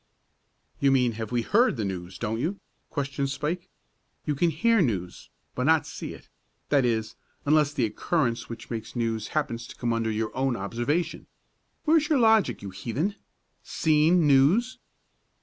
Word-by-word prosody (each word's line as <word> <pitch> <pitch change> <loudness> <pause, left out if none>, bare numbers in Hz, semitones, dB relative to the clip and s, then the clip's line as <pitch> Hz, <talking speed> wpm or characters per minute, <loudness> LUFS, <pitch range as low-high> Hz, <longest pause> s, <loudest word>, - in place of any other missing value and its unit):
"You 140 - +4
mean 125 -3 +3
have 110 0 -6
we 120 -1 +1
heard 230 - +3
the 110 - -1
news; 90 -1 -5
don't 115 0 -2
you?" 175 +10 -2 0.3
questioned 140 -1 -2
Spike. 155 +5 -3 0.6
"You 150 - 0
can 170 +5 +2
hear 225 +8 +3
news, 95 - -2 0.2
but - - -2
not - - +4
see - - -7
it, - - -16 0.4
that 140 -2 +4
is 110 -2 -1 0.3
unless 150 0 +4
the 135 -6 0
occurrence 120 +1 -1
which 115 +1 -8
makes 110 0 -5
news 115 -2 -1
happens 120 -5 -2
to - - -11
come 120 -1 -1
under 115 -1 0
your 110 0 -2
own 130 -1 +1
observation. 120 - -2 0.6
Where 320 +1 +5
is 305 0 0
your 305 - +4
logic, 220 - +3
you 100 - -6
heathen? 130 - -2 0.5
Seen 160 +2 +3
news!" 150 - +4
135 Hz, 165 wpm, -26 LUFS, 115-160 Hz, 0.6 s, Where